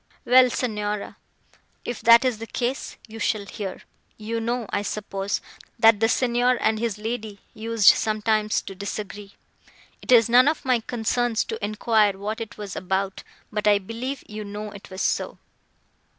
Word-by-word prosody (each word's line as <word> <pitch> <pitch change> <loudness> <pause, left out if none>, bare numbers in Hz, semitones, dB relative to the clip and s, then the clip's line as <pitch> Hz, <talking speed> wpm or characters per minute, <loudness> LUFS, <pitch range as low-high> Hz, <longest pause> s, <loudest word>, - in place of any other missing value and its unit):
"Well, 255 +1 +6
Signora, 210 -4 -3 0.7
if 240 - -4
that 235 +2 +7
is 245 -4 0
the 225 - -7
case, 250 +3 -3
you 225 0 -10
shall 210 -2 0
hear.—You 215 +3 -7
know, 235 +1 -2
I - - 0
suppose, 200 -1 -3 0.4
that 225 -2 +6
the 225 0 +3
Signor 245 0 +2
and 220 0 +1
his 225 -3 -2
lady 220 -2 -5
used 225 -2 0
sometimes 215 0 +1
to 195 - -8
disagree. 200 +1 -7 0.7
It - - -4
is 230 -3 +7
none 250 +3 +6
of 305 -1 0
my 255 -2 +3
concerns 235 0 0
to 450 -1 -6
enquire 210 -1 +2
what 210 +3 -4
it 225 +1 -7
was 205 -3 -7
about, 190 +1 -2 0.3
but 210 0 -1
I 205 -1 +6
believe 230 +7 -5
you 215 0 -6
know 210 +1 -6
it 200 -1 -12
was 190 0 -4
so." - - -1
220 Hz, 160 wpm, -24 LUFS, 205-235 Hz, 0.7 s, that